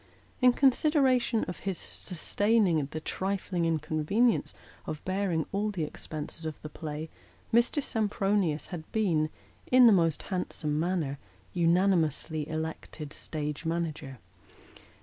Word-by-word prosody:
In 250 -1 +7
consideration 265 -3 +3
of 175 - -5
his 195 -3 -3
sustain 205 +5 0
ing 160 -6 +1
the 155 - -4
trifling 185 0 -2
inconvenience 160 +9 +1 0.3
of 155 - -5
bearing 185 -4 0
all 205 +2 0
the 185 -6 -2
expenses 155 +1 -6
of 155 -2 -5
the 155 - -5
play, 155 0 -5 0.5
Mr. 240 +5 +3
Sempronius 200 - 0
had 160 -2 -7
been, 170 -8 +2 0.4
in 255 0 +8
the 225 - +8
most 165 -5 +2
handsome 155 -5 -2
manner, 160 -5 -1 0.3
unanimously 165 -3 +2
elected 155 -1 -5
stage 150 -1 -4
manager. 160 -5 -3
170 Hz, 120 wpm, -29 LUFS, 155-205 Hz, 0.5 s, in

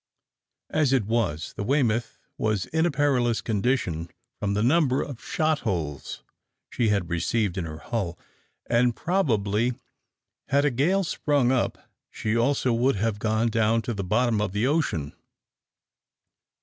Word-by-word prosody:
As 145 -4 +2
it 125 -6 +2
was, 100 -9 -1
the - - -4
"Weymouth" 120 -2 +1 0.2
was 105 -4 0
in 160 +2 +1
a - - +1
perilous 135 -6 +1
condition 100 -7 -1 0.3
from 100 -1 -1
the 105 - +1
number 135 0 +3
of 130 -5 -8
shot 155 -1 0
holes 80 - -4 0.5
she 115 -3 +1
had 100 -4 0
received 95 +3 0
in 95 -4 -2
her 80 -1 -7
hull, 90 -1 -3 0.5
and 120 0 +2
probably 120 - +1 0.7
had 140 +1 +2
a 145 - +3
gale 170 +11 +2
sprung 145 -6 +1
up, 130 -2 -1 0.2
she 110 +1 -2
also 125 +1 +2
would 125 +4 +2
have 105 +1 -1
gone 110 +1 +1
to 115 +1 +1
the 100 -2 -3
bottom 110 +3 +1
of 100 -3 -2
the 105 +3 +1
ocean. 130 - 0
115 Hz, 145 wpm, -26 LUFS, 105-135 Hz, 0.7 s, number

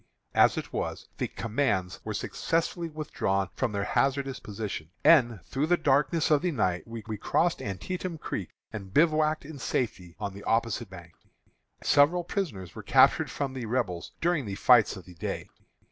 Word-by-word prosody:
As - - +5
it - - -5
was, - - -3
the - - 0
commands 105 -6 -1
were - - -4
successfully 165 +1 -1
withdrawn 100 - -1
from 130 -4 -1
their 100 -1 -1
hazardous 135 +3 0
position, 100 -7 -5
and 120 - +5
through 135 - -1
the 175 +1 +4
darkness 150 +3 +2
of 150 - +5
the 180 - +1
night 95 - 0
we 115 0 -6
crossed 115 - 0
Antietam 170 - -4
Creek, - - -4 0.2
and 100 -3 -7
bivouacked 155 -1 +3
in 150 -1 -9
safety 95 -9 -2
on 100 -2 -3
the 100 - -10
opposite 115 -1 0
bank. 85 -3 -11 0.7
Several 150 +5 +4
prisoners 140 - -4
were - - -7
captured - - +5
from 140 -2 -3
the 125 -4 -5
Rebels 110 -8 -2
during 170 -8 +1
the 100 - -3
fights 115 -1 +5
of 90 - -11
the 90 - -12
day. 85 - -4
125 Hz, 165 wpm, -28 LUFS, 100-155 Hz, 0.7 s, As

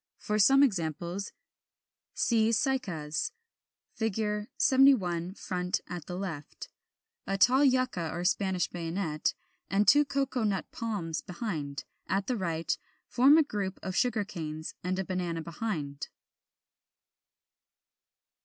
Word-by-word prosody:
For 210 0 -1
some 270 +7 +7
examples, 175 - -1 0.8
see 225 -2 +3
Cycas 195 - -1 0.6
(Fig. 210 -2 -1
71, 195 -10 +4
front, 180 -2 -2
at 175 -3 -7
the 180 - -5
left); 165 -7 -6 0.6
a 195 +1 0
tall 255 +7 +5
Yucca 255 - +2
or 175 +1 -4
Spanish 190 -3 +1
Bayonet, 165 -2 -2 0.3
and 200 +1 +2
two 295 0 +7
Cocoa 275 -3 -1
nut 200 -3 0
Palms 200 -8 -3
behind; 160 -8 -4 0.2
at 195 +1 0
the 250 - -1
right, 170 -5 -1 0.4
a 285 +6 +7
group 200 -7 -3
of 185 -1 -4
Sugar 225 -3 +1
canes, 155 -4 -6
and 185 +1 -1
a 190 - -2
Banana 175 -3 -2
behind. 160 -6 -4
190 Hz, 115 wpm, -30 LUFS, 170-225 Hz, 0.8 s, some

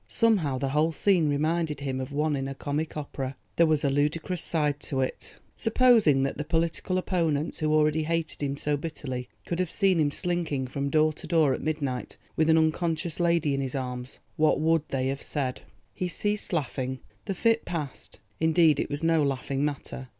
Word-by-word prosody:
Somehow 195 - +2
the 135 +1 -1
whole 150 +4 +2
scene 170 -2 +2
reminded 155 0 0
him 130 -2 -2
of 130 +2 -6
one 150 +1 0
in 135 -1 -2
a 135 - -5
comic 150 +3 -3
opera. 135 -2 -4 0.2
There 170 - +5
was 155 -2 +2
a 140 - +3
ludicrous 155 +5 0
side 150 -3 0
to 135 -2 -2
it. 130 - -4 0.2
Supposing 225 - +4
that 135 +1 -2
the - - -1
political 165 +3 0
opponents, 165 -5 0
who 155 -1 +1
already 155 0 +3
hated 165 -1 -2
him 140 -1 -1
so 145 +1 0
bitterly, 135 -5 -5 0.2
could 170 - -3
have 180 -2 0
seen 190 -2 +2
him 150 -2 +3
slinking 165 -4 -1
from 140 +2 -3
door 155 +1 +3
to - - -11
door 160 -5 +3
at - - -4
midnight 145 -5 -3 0.2
with 160 0 +2
an 160 - +6
unconscious 160 +1 0
lady 170 -4 +2
in 135 - 0
his 135 0 -3
arms—what 130 +4 -1
would 160 -1 +1
they 130 -1 -1
have 135 +1 -3
said? 130 -3 -2 0.3
He 180 - -2
ceased 205 +4 -2
laughing; 130 -5 -2 0.2
the 195 - -2
fit 230 +3 +2
passed—indeed 160 0 0
it - - -1
was 145 +2 -4
no 165 -1 +3
laughing 135 0 -1
matter. 140 -2 -4
155 Hz, 185 wpm, -27 LUFS, 140-165 Hz, 0.3 s, an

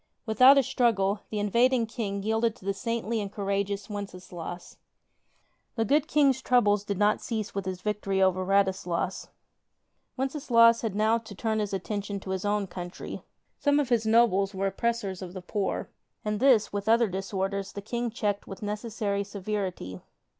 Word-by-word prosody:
Without 255 +5 +7
a 275 - +5
struggle, 225 -6 +1
the 215 - -4
in 205 -1 -1
vading 245 0 +3
King 205 -4 -4
yielded 220 +1 +1
to - - -17
the 200 - 0
saintly 230 +1 -2
and 200 -1 -5
courageous 200 0 -2
Wences 200 -3 -7
laus. 175 0 -7 1.0
The 225 -1 +1
good 290 +6 +2
King's 280 -5 +3
troubles 210 -6 +3
did 200 -2 -3
not 210 +1 +2
cease 215 -3 -3
with 195 -1 -3
his 185 -1 -4
victory 210 -2 -1
over 185 -1 +3
Radislas. 190 -2 0 0.9
Wenceslaus 245 -4 +4
had 220 -4 -3
now 220 +2 +3
to 220 -3 -11
turn 220 +2 -1
his 205 -2 -2
attention 200 +1 -3
to 190 - -6
his 190 +1 -2
own 205 0 +1
country. 175 -1 -7 0.4
Some 285 0 +3
of 280 -4 0
his 225 -3 +2
nobles 210 -4 +3
were 195 +1 -1
oppressors 200 -1 -1
of 180 -1 -7
the 185 - -6
poor, 200 +2 -2 0.3
and 210 -1 -1
this 245 -6 +4
with 205 +1 -2
other 230 0 +5
disorders 195 +1 -3
the 200 - -6
King 235 +2 -2
checked 210 -3 -2
with 195 0 -8
necessary 210 -1 -2
severity. 195 - -4
205 Hz, 170 wpm, -28 LUFS, 195-230 Hz, 1.0 s, Without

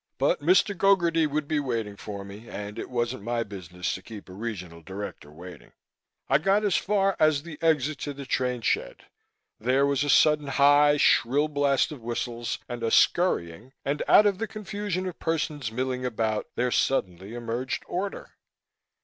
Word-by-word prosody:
But - - +1
Mr. 185 +6 +3
Gogarty 170 -4 +3
would 150 0 -2
be 155 0 0
waiting 115 -7 -3
for 100 -1 -7
me, 100 +4 -11
and 105 +2 -6
it - - -6
wasn't 120 -1 -2
my 115 +2 -1
business 90 -4 -5
to 95 - -6
keep 105 0 -11
a - - -10
Regional 95 -6 -6
Director 95 -4 -8
waiting. 90 +4 -12 0.5
I 140 - +4
got 195 +5 +2
as 200 - +2
far 195 -1 +1
as 155 -2 +3
the 160 -3 -9
exit 155 -3 +1
to 145 - -4
the 140 0 -8
train 125 -1 -1
shed. - - -1 0.6
There 130 +5 +2
was 140 0 +1
a 145 - -2
sudden 150 +2 +4
high, 145 +2 +5
shrill 145 +2 +3
blast 145 -2 +1
of 145 -5 -8
whistles 120 0 -3
and 120 -1 -6
a 115 - 0
scurrying 115 - +2
and, 140 +2 -1
out 210 - +7
of 200 -2 +2
the 225 - -2
confusion 205 -3 -4
of 180 -3 -6
persons 150 -6 -2
milling 125 +2 -2
about, 110 -3 -1
there 125 0 0
suddenly 95 -5 -1
emerged 120 +2 -3
order. 195 +3 -4
130 Hz, 175 wpm, -26 LUFS, 110-155 Hz, 0.6 s, out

